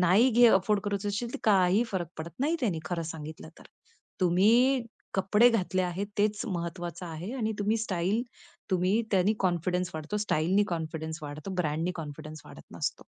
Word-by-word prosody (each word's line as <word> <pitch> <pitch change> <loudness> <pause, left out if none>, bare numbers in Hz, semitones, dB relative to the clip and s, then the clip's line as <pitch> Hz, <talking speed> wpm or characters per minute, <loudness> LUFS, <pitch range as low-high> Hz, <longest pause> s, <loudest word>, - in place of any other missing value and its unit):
नाही 190 +9 +5
घे 240 +1 +6
अफोर्ड 200 0 +3
कर 205 - -1
असशील 205 +4 -2
तर - - -3
काही 195 0 +4
फरक 175 -4 -2
पडत 160 +1 -5
नाही 315 +5 +2
त्यांनी 195 -11 0
खरं 170 +1 -2
सांगितलं 155 0 -8
तर. - - -15 0.6
तुम्ही 225 +9 +4 0.3
कपडे 210 +5 +5
घातले 185 -4 0
आहेत 180 +3 -2
तेच 210 +1 +1
महत्वाचं 175 -2 -4
आहे 165 +7 -6
आणि 220 -4 -1
तुम्ही 210 +2 +1
स्टाईल 195 +1 0 0.5
तुम्ही 185 +4 +2
त्यांनी 195 +2 +3
कॉन्फिडन्स 180 0 0
वाढतो 155 +6 -4
स्टाईलनी 185 +6 +2
कॉन्फिडन्स 160 -1 -5
वाढतो 150 +4 -6
ब्रँडनी 160 +4 -1
कॉन्फिडन्स 155 0 -8
वाढत - - -14
नसतो. - - -3
185 Hz, 160 wpm, -29 LUFS, 170-210 Hz, 0.6 s, घे